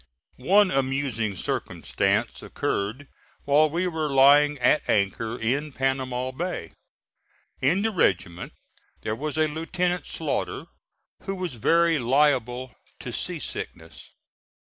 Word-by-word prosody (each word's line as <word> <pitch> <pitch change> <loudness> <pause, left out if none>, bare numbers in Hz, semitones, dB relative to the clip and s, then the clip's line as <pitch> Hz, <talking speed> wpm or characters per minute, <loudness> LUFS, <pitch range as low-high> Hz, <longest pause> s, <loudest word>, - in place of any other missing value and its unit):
One 195 +9 +4
amusing 130 -6 -1
circumstance - - -1
occurred 110 +8 -3 0.4
while 150 +2 +4
we 170 +4 -1
were 160 -4 -2
lying 145 +2 +5
at 130 +4 +2
anchor 110 +3 0
in 140 +7 -1
Panama 130 -1 -1
Bay. 165 - -5 0.9
In 175 +10 +2
the 225 - +1
regiment 90 - 0 0.5
there 110 - -2
was 150 +4 -4
a 155 0 +3
Lieutenant 175 +3 -2
Slaughter - - -3 0.6
who 195 - -3
was 180 -5 -4
very 165 +7 +3
liable 130 -1 +1 0.3
to - - -6
sea - - -2
sickness. 80 -3 -8
140 Hz, 115 wpm, -25 LUFS, 120-160 Hz, 0.9 s, lying